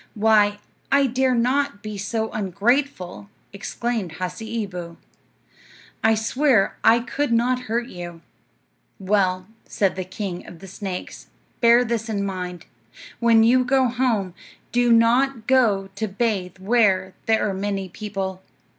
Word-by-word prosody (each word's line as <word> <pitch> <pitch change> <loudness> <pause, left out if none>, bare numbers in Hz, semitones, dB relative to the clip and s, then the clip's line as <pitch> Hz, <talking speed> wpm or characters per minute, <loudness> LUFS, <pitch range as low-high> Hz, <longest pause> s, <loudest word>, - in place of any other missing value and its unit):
"Why, 210 -1 +3 0.3
I 275 0 +5
dare 255 0 +1
not 255 -1 0
be 215 -1 -5
so 220 +3 -2
ungrateful," 205 0 -1 0.2
exclaimed 215 -2 -3
Hasseeboo. 185 -2 -5 1.1
"I 220 0 +4
swear 230 0 +2
I 230 +1 +5
could 265 +2 -2
not 250 +2 +1
hurt 235 +1 0
you." 175 -5 -8 0.8
"Well," 185 -2 +1 0.2
said 195 -2 0
the 190 - -3
king 185 -1 -6
of 175 - -11
the 195 - -12
snakes, 190 -1 -7 0.3
"bear 235 +1 +5
this 230 -1 -2
in 200 -2 -1
mind: 180 -3 -5 0.5
when 230 -1 +5
you 250 +3 +4
go 260 0 +2
home, 230 -7 0 0.4
do 245 0 +3
not 230 +1 +3
go 220 -7 +2
to 215 +2 -3
bathe 195 -3 -2
where 190 -2 +2
there 220 -1 +2
are 200 - -2
many 195 0 -3
people." 190 -1 -5
215 Hz, 130 wpm, -23 LUFS, 190-240 Hz, 1.1 s, I